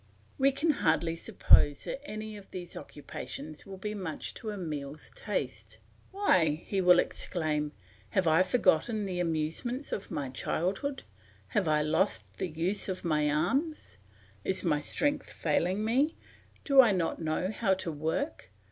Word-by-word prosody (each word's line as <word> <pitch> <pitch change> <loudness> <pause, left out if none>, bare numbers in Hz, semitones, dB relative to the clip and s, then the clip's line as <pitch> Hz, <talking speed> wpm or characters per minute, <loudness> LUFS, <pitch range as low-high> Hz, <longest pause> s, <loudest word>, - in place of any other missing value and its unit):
We 275 +1 +5
can 300 +4 +2
hardly 165 - +1
suppose 145 -3 +4
that 275 - -5
any 215 0 -5
of 200 -2 -12
these 175 -2 -7
occupations 145 +2 -8
will 195 -1 -8
be 210 +3 -4
much 185 -7 -5
to 220 - -6
Emile's 155 -7 -5
taste. - - -4 0.3
"Why," 175 - +2
he 195 -2 0
will 180 -1 +7
exclaim, 155 -4 -1 0.4
"have 190 - +1
I 160 +3 +5
forgotten 205 +1 +2
the 185 -2 -3
amusements 170 - -2
of 200 - -4
my 145 -5 -3
childhood? 195 - -2 0.5
Have 205 -7 +1
I 150 -1 +3
lost 160 +6 0
the - - 0
use 170 +6 -1
of 185 -1 -4
my 150 -2 +2
arms? 185 - -1 0.4
Is 190 - -1
my 150 -5 +2
strength 290 - -1
failing 180 +6 0
me? 270 +8 +2 0.5
Do 275 -2 +8
I 230 -5 +4
not 170 -2 -1
know 160 +4 -1
how 205 -3 +1
to 185 -3 -4
work? 160 - -3
185 Hz, 150 wpm, -30 LUFS, 155-215 Hz, 0.5 s, Do